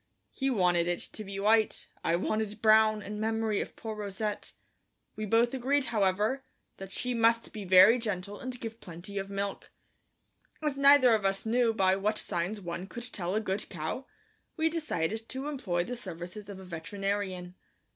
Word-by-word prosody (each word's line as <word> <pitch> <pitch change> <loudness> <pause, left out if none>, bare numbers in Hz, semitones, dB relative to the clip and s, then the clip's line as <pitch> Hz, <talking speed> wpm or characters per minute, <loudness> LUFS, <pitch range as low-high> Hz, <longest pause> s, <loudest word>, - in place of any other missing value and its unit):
He 270 0 -1
wanted 180 -7 +2
it 175 0 +1
to 215 - -6
be 195 -1 -6
white; 220 +2 +3 0.2
I 165 - +2
wanted 215 +3 -1
brown 215 -1 +5
in 210 +1 -6
memory 220 -1 0
of - - -7
poor 220 -1 -6
Rousette. 210 0 -4 0.6
We 215 0 -4
both 230 +4 +3
agreed, 265 +2 +1
however, 210 +6 +1 0.3
that 195 0 -8
she 250 +4 0
must 230 0 +2
be 210 -2 -6
very 190 +6 +7
gentle 205 -3 -4
and 255 -1 -5
give 225 -1 -7
plenty 180 +4 -7
of 195 0 -5
milk. 200 0 -4 0.9
As 300 -3 -1
neither 275 -3 +7
of 215 -2 +2
us 195 +1 0
knew 235 +1 +3
by 190 -4 +3
what 210 +2 0
signs 180 +4 -2
one 175 0 -5
could 240 +3 -8
tell 185 -1 -2
a - - +3
good 200 -1 -2
cow, 170 - -4 0.5
we 320 0 +2
decided 225 - -2
to 265 +2 -4
employ 195 -12 -1
the 245 +7 -5
services 185 -1 -8
of 195 -2 -8
a 190 - -10
veterinarian. 185 +1 -3
210 Hz, 175 wpm, -30 LUFS, 190-230 Hz, 0.9 s, very